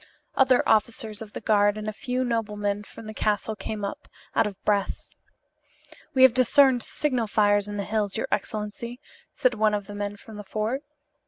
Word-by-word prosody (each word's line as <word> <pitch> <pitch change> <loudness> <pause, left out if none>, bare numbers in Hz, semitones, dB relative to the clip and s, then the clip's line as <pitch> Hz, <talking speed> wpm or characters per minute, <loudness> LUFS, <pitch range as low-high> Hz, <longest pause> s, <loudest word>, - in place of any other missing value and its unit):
Other 260 -2 +4
officers 220 0 +1
of 215 -2 -9
the - - -6
guard 205 -1 +3
and 215 0 -5
a 215 - -2
few 250 +3 -2
noblemen 210 -4 -1
from 225 - -12
the 215 - -7
castle 215 +1 -1
came 210 -1 -4
up, 200 - -6 0.3
out 220 - +3
of 200 -2 -8
breath. 205 -2 +1 1.2
"We 260 - +6
have 260 -3 +8
discerned 255 0 +5
signal 255 -3 0
fires 205 -1 +3
in 205 0 -5
the 200 - -1
hills, 210 -1 -1
your - - -2
excellency," 220 +3 -3 0.4
said 255 -1 +2
one 215 -1 +2
of 205 -1 -4
the 205 - -9
men 205 0 -4
from 215 +1 -12
the 210 - -7
fort. 215 +7 -2
215 Hz, 185 wpm, -26 LUFS, 205-235 Hz, 1.2 s, have